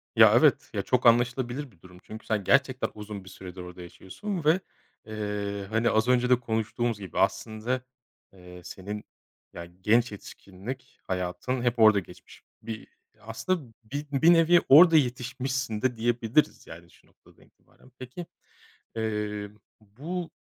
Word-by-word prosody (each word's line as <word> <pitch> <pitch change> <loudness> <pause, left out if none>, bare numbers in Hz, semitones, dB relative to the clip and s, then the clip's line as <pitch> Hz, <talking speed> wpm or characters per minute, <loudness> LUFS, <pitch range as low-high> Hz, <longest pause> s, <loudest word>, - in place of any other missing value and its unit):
Ya, - - +8
evet, - - +3
ya - - -1
çok 125 -1 0
anlaşılabilir 120 +3 +2
bir 85 -5 -27
durum 90 -1 -15
çünkü 110 0 -10
sen 105 -3 -1
gerçekten 130 +3 +2
uzun 105 -2 -8
bir 95 - -12
süredir 90 -1 -10
orada 90 0 -10
yaşıyorsun 165 - -6
ve, 160 +4 +4 0.5
eee, 105 -2 -4
hani, 110 +2 +1
az 110 +2 +2
önce 125 0 +3
de 125 -1 +5
konuştuğumuz 115 0 -2
gibi 95 -2 -6
aslında, 110 +6 -1 0.5
eee, 90 -1 -13
senin, 100 +4 -7 0.5
ya, 85 - -7 0.2
genç 115 +4 +3
yetişkinlik 105 +5 -10
hayatın 95 +8 -3
hep 120 -1 0
orada 110 -2 +7
geçmiş. 90 -1 -14 0.2
Bir 110 -1 -7 0.3
aslında, 115 - -4
bir 145 +6 -5
bir 160 +5 +5
nevi 170 +1 +5
orada 165 +4 +9
yetişmişsin 130 -3 -2
de 130 -2 0
diyebiliriz, 120 +4 0
yani, 85 +1 -12
şu - - -24
noktadan - - -24
itibaren. 130 - -25
Peki, 130 +7 -8 0.7
eee, 105 -2 -3 0.3
bu 155 - -6
115 Hz, 145 wpm, -27 LUFS, 100-130 Hz, 0.7 s, orada